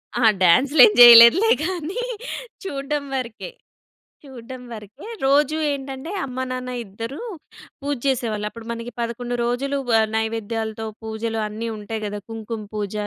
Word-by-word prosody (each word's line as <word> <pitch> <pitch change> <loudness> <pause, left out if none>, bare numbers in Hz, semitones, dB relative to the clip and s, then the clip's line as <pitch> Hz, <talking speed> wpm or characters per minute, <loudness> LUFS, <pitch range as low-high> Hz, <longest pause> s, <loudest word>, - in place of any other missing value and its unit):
ఆ! 240 - 0 0.2
డ్యాన్స్‌లు 260 - +5
ఏం - - +4
జేయలేదులే 240 - +9
గానీ, 365 +6 -3 0.6
చూడ్డం 285 -4 -3
వరకే. 240 - -5 0.7
చూడ్డం 255 -1 -10
వరకే. 215 - -11 0.2
రోజు 290 +2 +3 0.2
ఏంటంటే, 270 +3 -6
అమ్మ-నాన్న 255 -1 -5
ఇద్దరూ 230 +7 -7 0.6
పూజ 285 0 -2
చేసేవాళ్ళు. 230 -6 -1
అప్పుడు 225 +1 -12
మనకి 230 +1 -6
11 240 +1 -4
రోజులు 275 +4 -1 0.2
ఆహ్, 220 - +2
నైవేద్యాలతో 220 0 -3 0.2
పూజలు 220 0 -4
అన్నీ 220 +2 -5
ఉంటాయి 215 +1 -6
గదా! 205 0 -5
కుంకుమ 225 0 -6
పూజ, 205 -1 -4
235 Hz, 125 wpm, -22 LUFS, 220-275 Hz, 0.7 s, జేయలేదులే